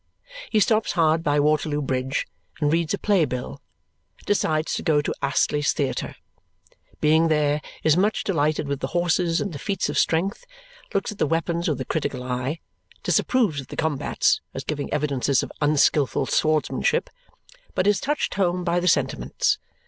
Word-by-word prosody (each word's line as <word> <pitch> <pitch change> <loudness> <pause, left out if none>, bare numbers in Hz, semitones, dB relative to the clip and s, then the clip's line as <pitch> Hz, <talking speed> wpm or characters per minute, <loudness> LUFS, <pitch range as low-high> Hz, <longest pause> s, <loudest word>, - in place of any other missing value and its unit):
He 215 - +2
stops 220 +1 +2
hard 160 -1 +3
by 145 -2 +1
Waterloo 150 0 +1
Bridge 130 0 -1 0.3
and 145 -1 +1
reads 165 -2 +1
a - - -11
playbill, 155 -12 0 0.6
decides 155 -6 0
to - - -2
go 155 -2 +2
to 145 - -1
Astley's 140 +1 +1
Theatre. 140 -2 -2 0.8
Being 160 +2 +4
there, 150 -1 +1 0.2
is 155 -1 +4
much 205 +4 +1
delighted 155 -5 0
with 140 -1 -2
the - - -2
horses 175 0 +1
and 200 -5 -3
the 140 - -6
feats 195 +3 -2
of - - 0
strength; 185 - 0 0.5
looks 195 - -1
at 210 - -11
the - - +2
weapons 170 +2 -1
with - - -1
a - - -3
critical 135 -5 -2
eye; 125 +5 -3 0.4
disapproves 210 - +1
of 135 - -13
the - - -8
combats 155 -4 +1
as - - -4
giving 145 -2 -4
evidences 140 -3 +1
of - - -6
unskilful 145 -1 +2
swordsmanship; 155 - +1 0.7
but 185 - +1
is 205 -1 +3
touched 295 +2 -1
home 180 -2 0
by 175 0 +1
the 180 - -1
sentiments. - - +1
155 Hz, 165 wpm, -24 LUFS, 145-180 Hz, 0.8 s, Being